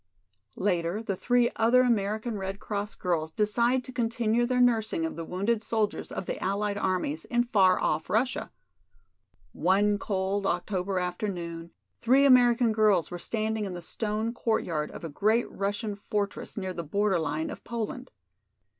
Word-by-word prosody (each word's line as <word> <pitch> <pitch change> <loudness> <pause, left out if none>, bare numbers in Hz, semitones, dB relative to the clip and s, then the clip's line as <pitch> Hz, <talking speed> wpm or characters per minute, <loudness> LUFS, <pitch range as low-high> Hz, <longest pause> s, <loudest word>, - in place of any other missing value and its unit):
Later 180 +1 0
the 200 -3 -2
three 245 +4 +2
other 235 +3 +5
American 220 -1 0
Red 195 0 -4
Cross 205 0 -4
girls 165 -4 -1
decide 235 +7 +1
to 255 - -9
continue 235 -1 +1
their 250 0 +1
nursing 220 -8 +2
of 160 - -4
the 165 - -5
wounded 200 +7 -1
soldiers 220 -2 -1
of - - -4
the - - -4
Allied 200 +2 -1
armies 180 -6 -1
in 240 0 +1
far 195 -6 +4
off 155 +1 -1
Russia. 245 +4 0 1.0
One 205 +2 +2
cold 195 0 -1
October 185 +1 -1
afternoon 175 -2 -3 0.3
three 260 +4 +5
American 245 -3 +5
girls 215 -5 +3
were 175 - -5
standing 220 +1 -2
in 185 -2 -5
the 175 - -6
stone 220 +5 -2
courtyard 170 -10 -1
of - - -10
a - - -3
great 215 +10 +1
Russian 205 +2 -2
fortress 205 0 -3
near 190 -2 -3
the 170 - -5
border 195 +3 +1
line 155 0 -2
of - - -9
Poland. 235 +2 -5
205 Hz, 155 wpm, -28 LUFS, 185-230 Hz, 1.0 s, other